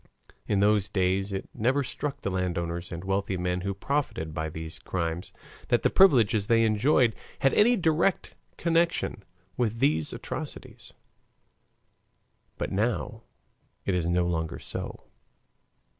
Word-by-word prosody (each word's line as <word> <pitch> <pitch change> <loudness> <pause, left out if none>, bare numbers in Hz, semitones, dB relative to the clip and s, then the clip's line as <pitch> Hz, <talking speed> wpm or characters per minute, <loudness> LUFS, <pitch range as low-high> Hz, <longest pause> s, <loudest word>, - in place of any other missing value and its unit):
In 100 -1 +2
those 105 -1 +3
days 95 +1 0
it 95 0 -4
never 130 +6 +1
struck 145 +2 -4
the 100 - -2
landowners 85 -1 -2
and 85 0 -5
wealthy 95 0 -1
men 90 0 -1
who 100 +1 -2
profited 100 - -2
by 80 0 -2
these 80 +1 -7
crimes, 85 -1 -3 0.4
that - - +2
the - - +3
privileges 115 - +5
they 115 -1 +4
enjoyed 115 +2 +3 0.3
had 135 - +4
any 240 +4 +5
direct 170 -1 +1 0.2
connection 170 -8 +1 0.4
with 115 -2 0
these 80 -6 +2
atrocities. - - -7 1.7
But - - -3
now 110 +4 -1 0.6
it 95 - +1
is 90 -2 0
no 90 0 +2
longer 80 -1 -2
so. - - -6
100 Hz, 130 wpm, -27 LUFS, 90-125 Hz, 1.7 s, privileges